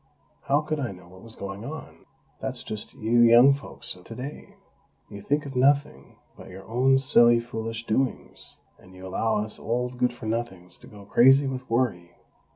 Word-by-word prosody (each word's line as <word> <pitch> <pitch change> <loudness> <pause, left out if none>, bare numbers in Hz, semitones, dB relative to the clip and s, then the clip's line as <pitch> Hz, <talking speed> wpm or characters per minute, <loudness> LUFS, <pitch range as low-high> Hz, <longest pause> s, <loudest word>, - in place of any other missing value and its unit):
_ - - -26
How 140 +2 +3
could 155 0 -3
I 130 -6 -3
know 90 -2 -14
what 95 +1 -15
was 115 -1 -7
going 100 +1 -7
on? 155 +6 -9 0.3
That's - - -4
just 105 -1 -6
you 115 +2 +1
young 120 +3 +7
folks 125 -4 -3
of 90 - -16
today. 125 +8 -9 0.6
You 100 - -8
think 145 +7 -1
of 135 -2 -8
nothing 140 +3 +1 0.2
but - - -13
your 95 +1 -11
own 130 +4 +3
silly, 120 -3 +5
foolish 115 -1 -6
doings, 130 +4 -3 0.2
and 95 0 -17
you 95 +1 -11
allow 105 +3 0
us 110 - -2
old 125 +2 -3
good 125 -1 +2
for 120 -2 -11
nothings 110 -6 -5
to - - -15
go 100 -1 -13
crazy 135 +7 +5
with 130 -1 -5
worry!!" 100 -8 -1
120 Hz, 185 wpm, -25 LUFS, 105-130 Hz, 0.6 s, young